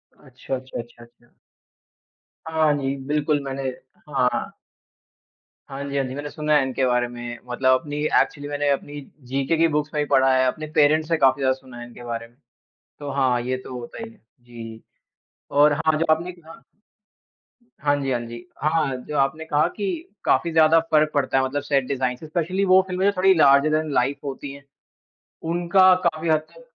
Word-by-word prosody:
अच्छा, 130 -1 -7
अच्छा, 130 -1 -7
अच्छा, 120 0 -16
अच्छा। 120 0 -23 1.1
हाँ 160 -1 +2
जी, 135 -1 -2
बिल्कुल 150 0 +1
मैंने 135 0 -5 0.5
हाँ। 125 -3 0 1.2
हाँ 140 0 -6
जी, 140 0 -4
हाँ 135 - +1
जी, 130 - -6
मैंने 145 +1 -5
सुना 150 0 -1
है 145 - +5
इनके 130 0 -1
बारे 125 -1 +1
में। 120 0 -7
मतलब 130 +1 +2
अपनी 145 -2 -7 0.2
एक्चुअली 145 -1 -4
मैंने 145 0 -1
अपनी 145 +1 -3 0.3
जीके 140 +4 0
की 165 +1 +4
बुक्स 150 -1 -1
में 150 - 0
भी - - -6
पढ़ा 130 0 +4
है, 130 0 +3
अपने 155 +4 -3
पेरेंट्स 155 +1 +4
से 165 - +2
काफ़ी 135 0 +3
ज़्यादा 130 -1 +3
सुना 130 -2 -13
है 120 - -7
इनके 120 0 -13
बारे 115 -1 -5
में। 120 +2 -30 0.6
तो 145 -1 -6
हाँ, 130 -3 +1
ये 130 +1 -2
तो 125 - -7
होता 120 - -9
ही 225 - -10
है। 225 - -20 0.2
जी, 115 -2 -10 0.7
और 145 +1 +5
हाँ, 155 +1 +1
जो 165 - 0
आपने 170 +3 -6
कहा 165 -2 -15 1.2
हाँ 145 -1 +2
जी, 135 - -2
हाँ 125 - 0
जी, 120 +8 -9 0.2
हाँ। 155 -3 +1
जो 150 - -3
आपने 140 +4 0
कहा 150 +1 +2
कि 205 -2 -3 0.4
काफ़ी 170 - +2
ज़्यादा 160 0 +5
फ़र्क 155 0 +3
पड़ता 135 -2 +1
है। 130 - +3
मतलब 145 +2 -2
सेट 140 -2 +1
डिजाइन 130 -2 -1
से 155 - -11
स्पेशली 175 +4 -1
वो 185 0 +6
फिल्में 185 +1 -1
जो 200 - +5
थोड़ी 190 +1 +5
लार्जर 140 -3 +5
दैन 155 0 0
लाइफ 135 +4 0
होती 140 0 -6
है, 140 0 -13 0.8
उनका 175 +3 +4
काफ़ी 165 0 0
हद 155 -1 +3
तक - - -17
145 Hz, 195 wpm, -23 LUFS, 130-155 Hz, 1.2 s, वो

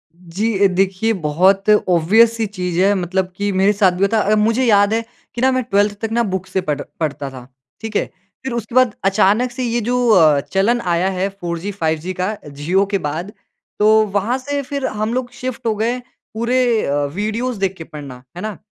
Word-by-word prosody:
जी। 185 +6 -3
अ, - - +7
देखिए 195 +4 +1
बहुत 190 +7 +3
ऑब्वियस-सी 210 +4 +4
चीज़ 180 -4 -3
है, 200 +2 +4
मतलब 185 0 -1
कि 205 0 -1
मेरे 200 +2 +4
साथ 195 -2 +3
भी 200 - +5
था। 220 - +4
अ, 210 +1 +2
मुझे 225 +4 +2
याद 205 -2 +4
है 225 - +1 0.3
कि 240 - -3
ना 260 +1 +4
मैं 255 0 0
12th 205 -2 +1
तक 225 -1 -3
ना 235 +1 +2
बुक 185 0 -5
से 190 - -1
पढ़ 150 -5 -2 0.2
पढ़ता 145 -3 -3
था, 125 -2 -11 0.3
ठीक 220 -1 -6
है। - - 0 0.3
फिर 265 -2 -4
उसके 235 +1 -5
बाद 255 -4 +4
अचानक 210 +5 +3
से 255 +1 -4
ये 240 0 0
जो 245 +2 0
अ, 160 -8 +5
चलन 200 +10 0
आया 175 +3 +1
है 190 +1 -1
4G, 180 0 -5
5G 160 +3 -1
का 195 +4 -1
जियो 155 +8 0
के - - +4
बाद, 165 +7 -4 0.5
तो 210 - +4 0.3
वहाँ 215 +6 +1
से 285 +2 -3
फिर 280 0 -4
हम 215 +2 -2
लोग 250 -1 -2
शिफ़्ट 255 -2 -6
हो 220 - +1
गए 230 +4 0 0.4
पूरे 235 +3 0 0.3
अ, 145 +1 0
वीडियोज़ 220 +3 -2
देख 195 -1 0
के 165 - -7
पढ़ना, 140 -5 -10
है - - -5
ना। 215 -1 -5
205 Hz, 205 wpm, -18 LUFS, 180-230 Hz, 0.5 s, अ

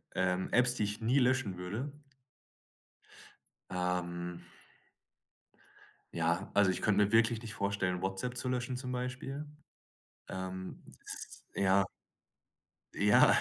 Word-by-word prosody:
Ähm, 95 0 +1
Apps 125 0 +4
die 110 - 0
ich 105 +1 -2
nie 120 +5 +3
löschen 125 -7 +2
würde? 105 +11 -4 1.8
Ähm 90 -1 -2 1.7
Ja, 85 +4 0
also 100 -2 +5
ich 90 - -3
könnte 105 -1 +4
mir 100 - -3
wirklich 115 0 +4
nicht 110 -2 -5
vorstellen, 100 -3 0
WhatsApp 95 +6 -2
zu 125 +1 -2
löschen 125 0 -1
zum 125 0 -4
Beispiel, 130 +3 -3 0.8
ähm, 95 0 -5 0.2
s - - -8
ja. 100 0 +4 1.1
Ja, 105 +1 +6
100 Hz, 110 wpm, -33 LUFS, 95-125 Hz, 1.8 s, Ja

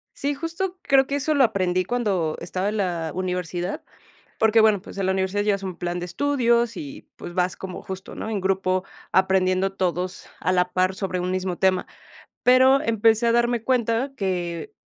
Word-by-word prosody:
Sí, 285 +1 -1
justo 335 +5 -4
creo 270 -1 +4
que 280 - -1
eso 285 +2 0
lo 280 -2 +4
aprendí 185 -5 +1
cuando 190 -9 0
estaba 185 +3 -2
en 215 - -3
la 170 -5 -1
universidad, 180 0 -3 0.6
porque, 220 0 +4
bueno, 215 -3 +4
pues - - -11
en 195 - 0
la 190 - +2
universidad 190 +2 0
llevas 200 -2 +1
un 185 -2 -5
plan 175 0 -3
de 175 - -4
estudios 235 +1 +1
y 145 -5 -8
pues 175 - -8
vas 180 0 0
como 185 -1 -7
justo, 190 0 -7
¿no?, 220 - -5
en 210 -3 -1
grupo 185 0 0 0.3
aprendiendo 190 0 +2
todos 180 -1 -2
a - - 0
la 180 0 +1
par 185 +1 +1
sobre 185 -1 -3
un 180 +1 -2
mismo 185 -1 -2
tema. 190 -1 +2 0.6
Pero 260 +2 +6
empecé 225 +1 +3
a - - +4
darme 240 -1 +1
cuenta 245 +1 +1
que 180 - -3
190 Hz, 185 wpm, -24 LUFS, 185-235 Hz, 0.6 s, Pero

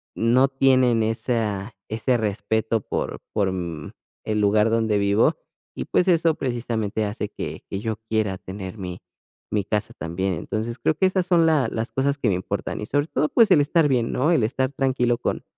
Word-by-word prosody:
no 125 +4 +4
tienen 130 -3 +3
esa 110 -2 -1 0.2
ese 115 +3 +1
respeto 110 +1 -1
por - - -4
por 100 -3 +1
mm, 85 -5 -5 0.3
el 105 -1 0
lugar 105 +2 +3
donde 110 -2 +1
vivo 100 +2 +3 0.4
y - - -4
pues, 180 - +1
eso 165 -2 +3
precisamente 115 -4 -2
hace 105 0 -4
que - - -6
que 95 - -3
yo 110 -1 -2
quiera 105 -4 0
tener 95 +2 -8
mi 90 -2 -6 0.5
mi 105 - +1
casa 105 0 -2
también, 95 +3 -2
entonces 110 +8 -4
creo 155 - +1
que 190 - +2
esas 185 -1 0
son 170 -2 +4
las 150 -7 +3
las 115 +2 -3
cosas 140 +2 0
que 120 - +1
me 90 - +2
importan 90 - -4
y - - -3
sobre 145 +2 0
todo, 150 -1 0
pues, 230 -3 +4
el - - +7
estar 155 +1 +3
bien, 120 -3 +1
¿no?, 150 +7 +2
el 130 -10 +3
estar 130 +3 0
tranquilo 130 -3 +1
con - - -2
115 Hz, 190 wpm, -23 LUFS, 105-135 Hz, 0.5 s, el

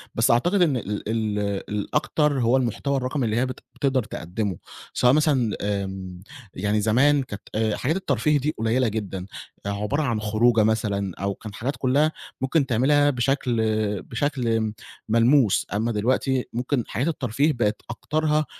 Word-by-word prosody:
بس 115 - +3
أعتقد 175 +12 +2
إن 150 -7 +3
ال 105 -3 -4
ال 110 -2 -1 0.3
الأكتر 145 +6 0
هو 120 +3 +3
المحتوى 130 +3 -1
الرقمي 130 +1 -1
اللي 110 0 0
هي 125 - +2
بت 130 - -6 0.2
بتقدر 135 -3 +1
تقدمه، 95 -1 -4 0.4
سواء 125 0 +4
مثلًا 140 -7 +2
آمم، 95 -3 -4 0.3
يعني 105 +2 0
زمان 135 +6 +3
كانت 105 -5 -8
آآ، 110 -1 +1
حاجات 150 +6 -1
الترفيه 150 - +1
دي 150 +3 -2
قليلة 115 +3 +1
جدًا، 100 -4 -4 0.4
عبارة 105 +8 -1
عن 120 -6 0
خروجة 110 +2 +3
مثلًا 105 -4 0
أو 100 +1 -1
كان 110 -2 -9
حاجات 130 +7 -3
كلّها 140 +5 +2 0.3
ممكن 140 +2 +2
تعملها 140 +4 +3
بشكل 125 -2 0 0.4
بشكل 130 0 -2
آمم، 110 -1 0 0.4
ملموس 115 0 +4
أمّا 110 +3 0
دلوقتي 125 +4 0
ممكن 125 +2 -1
حاجات 130 +6 -2
الترفيه 140 0 +1
بقت 110 -4 -1
أكترها 155 +5 0
120 Hz, 150 wpm, -24 LUFS, 105-140 Hz, 0.4 s, سواء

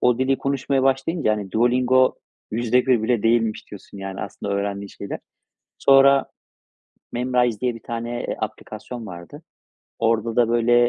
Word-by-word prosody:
o 125 -1 +3
dili 130 +1 +1
konuşmaya 135 -1 0
başlayınca, 135 -1 +1
hani, 105 -3 -4
Duolingo 125 +3 +3 0.4
%1 120 +1 +2
bile 115 -1 +1
değilmiş 115 -1 +1
diyorsun, 100 -1 -11
yani, 95 0 -6
aslında 100 +1 -5
öğrendiğim 100 0 -3
şeyler. 100 - -7 0.6
Sonra 135 0 +5 0.9
Memrise 125 -3 +1
diye 125 -2 0
bir 115 - -11
tane, 120 0 -4
eee, - - -2
aplikasyon 110 +2 -6
vardı. 90 - -10 0.6
Orada 115 0 0
da 120 -2 +4
böyle, 120 +1 +4
120 Hz, 140 wpm, -22 LUFS, 110-130 Hz, 0.9 s, Sonra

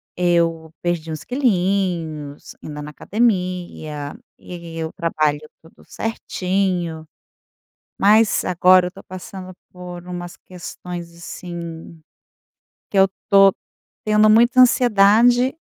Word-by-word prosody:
eu 170 -2 +1
perdi 170 -2 -2
uns 155 - -6
quilinhos, 180 - -1
indo 150 -1 -7
na 150 - -7
academia 180 -8 -2 0.2
e 170 -2 -8
o 160 - -5
trabalho 155 -3 0 0.2
tudo 160 - -20
certinho, 185 -6 -2 0.9
mas 215 +2 +4
agora 180 0 +4
eu - - -7
tô - - -14
passando 185 0 -9 0.2
por 180 -1 -10
umas 175 -1 -7
questões, 175 -1 -8
assim, 170 -1 -8 0.9
que 200 - -2
eu 190 - +6 0.2
tô 195 -1 +6 0.5
tendo 215 0 +4
muita 240 +3 +5
ansiedade 245 +1 +4
180 Hz, 105 wpm, -20 LUFS, 165-200 Hz, 0.9 s, eu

